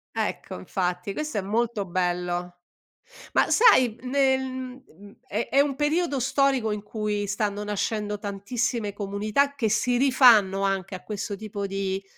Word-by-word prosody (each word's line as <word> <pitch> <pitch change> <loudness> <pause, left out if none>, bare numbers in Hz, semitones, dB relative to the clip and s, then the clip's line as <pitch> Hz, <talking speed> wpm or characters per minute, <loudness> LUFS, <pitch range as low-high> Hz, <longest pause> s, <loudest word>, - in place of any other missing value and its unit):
Ecco, - - -3
infatti, 180 - -2
questo 305 -3 -3
è - - -2
molto 220 +1 -1
bello. 175 0 -2 0.8
Ma - - +3
sai, 260 - +5
nel 265 0 +2
m 260 0 -6
uhm, 200 +5 -16
è 220 +2 -3
è 275 - +3
un 280 -1 +2
periodo 300 -1 0
storico 265 -3 +1
in 210 -1 -3
cui 210 -1 -3
stanno 205 0 -2
nascendo 210 0 -2
tantissime 205 +2 -2
comunità, 210 +7 0
che 235 -6 -1
si 240 +3 +1
rifanno 235 -8 +5
anche 195 -1 -1
a 185 - -10
questo 205 0 -4
tipo 205 -1 -5
di 195 0 -3
210 Hz, 150 wpm, -25 LUFS, 195-255 Hz, 0.8 s, sai